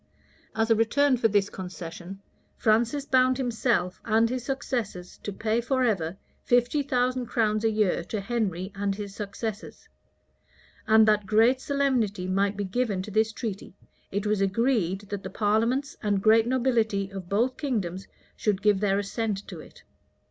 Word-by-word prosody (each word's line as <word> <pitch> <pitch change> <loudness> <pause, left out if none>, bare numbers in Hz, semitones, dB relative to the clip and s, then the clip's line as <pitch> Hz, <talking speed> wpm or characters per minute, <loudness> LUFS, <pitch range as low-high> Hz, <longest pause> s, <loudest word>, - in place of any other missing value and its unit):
As 225 +1 +1
a - - +6
return 260 +5 +3
for 235 -2 +2
this 200 -2 +1
concession, 185 +1 -8 0.3
Francis 235 +6 +2
bound 255 -1 +3
himself 235 -7 0
and 225 +1 +2
his 255 -1 -3
successors 235 -9 -4
to 205 - -4
pay 220 +3 -1
forever 225 - 0 0.3
fifty 245 +4 +2
thousand 255 -2 0
crowns 215 -2 0
a 225 - +3
year 210 -5 +1
to 215 - -3
Henry 200 -4 -2
and 200 0 -2
his 200 -1 -7
successors; 210 +1 -6 1.0
and 220 0 +6
that 210 -2 +2
greater 225 +5 +4
solemnity 260 -9 0
might 195 +2 0
be 205 - -1
given 200 -2 -1
to 210 - -8
this 220 +2 +2
treaty, 210 -5 -6 0.4
it 200 +1 -2
was 210 -1 +1
agreed 195 -2 +1
that 205 -1 -6
the - - -6
parliaments 230 +6 0
and 205 -3 0
great 225 +1 +5
nobility 230 -6 +1
of 190 -3 -8
both 235 +6 +1
kingdoms 195 - -3 0.3
should 200 -2 -1
give 210 -2 +4
their 200 -1 +1
assent 205 0 -3
to - - -8
it. - - -14
215 Hz, 155 wpm, -26 LUFS, 195-240 Hz, 1.0 s, a